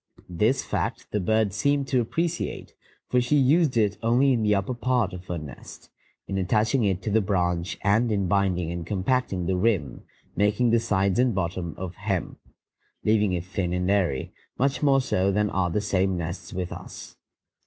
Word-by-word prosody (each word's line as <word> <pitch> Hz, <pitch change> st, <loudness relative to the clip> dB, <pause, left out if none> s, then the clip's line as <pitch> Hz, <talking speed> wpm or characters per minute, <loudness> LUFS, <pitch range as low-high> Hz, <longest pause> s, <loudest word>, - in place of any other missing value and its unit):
This 110 Hz, +10 st, +1 dB
fact -, -, -2 dB
the 105 Hz, -, 0 dB
bird 110 Hz, +1 st, +1 dB
seemed 140 Hz, +5 st, +1 dB
to 130 Hz, -3 st, +3 dB
appreciate, 165 Hz, +8 st, -3 dB, 0.3 s
for 125 Hz, -, +2 dB
she 125 Hz, +5 st, +1 dB
used 145 Hz, 0 st, +3 dB
it 105 Hz, -3 st, +1 dB
only 125 Hz, +4 st, +3 dB
in 120 Hz, -, 0 dB
the 105 Hz, -1 st, +3 dB
upper 100 Hz, +6 st, -1 dB
part 120 Hz, -5 st, 0 dB
of 90 Hz, 0 st, -9 dB
her 90 Hz, -, -3 dB
nest, 75 Hz, -4 st, -11 dB, 0.4 s
in 95 Hz, -, -2 dB
attaching 110 Hz, +6 st, +1 dB
it 95 Hz, -2 st, 0 dB
to 110 Hz, -, -2 dB
the 110 Hz, +2 st, +3 dB
branch 90 Hz, -2 st, -1 dB
and 110 Hz, +4 st, +2 dB
in 100 Hz, -3 st, 0 dB
binding 90 Hz, -4 st, +1 dB
and 85 Hz, 0 st, -4 dB
compacting 95 Hz, +1 st, -1 dB
the 95 Hz, -, 0 dB
rim, 90 Hz, -7 st, 0 dB, 0.3 s
making 105 Hz, +4 st, +2 dB
the 115 Hz, -, +4 dB
sides 100 Hz, -2 st, +1 dB
and 125 Hz, -4 st, +2 dB
bottom 85 Hz, -2 st, -3 dB
of 95 Hz, -1 st, -5 dB
hemp, 100 Hz, -3 st, -3 dB, 0.6 s
leaving 105 Hz, -3 st, +2 dB
it 90 Hz, -1 st, -2 dB
thin 95 Hz, -2 st, -2 dB
and 90 Hz, +1 st, 0 dB
airy, 90 Hz, -10 st, 0 dB, 0.2 s
much 135 Hz, +2 st, 0 dB
more 135 Hz, -2 st, +4 dB
so 95 Hz, -6 st, +1 dB
than 105 Hz, +1 st, +1 dB
are 90 Hz, -2 st, 0 dB
the 95 Hz, +5 st, 0 dB
same 95 Hz, -2 st, 0 dB
nests 85 Hz, +2 st, -5 dB
with 90 Hz, -1 st, -4 dB
us. -, -, -9 dB
100 Hz, 185 wpm, -25 LUFS, 90-115 Hz, 0.6 s, the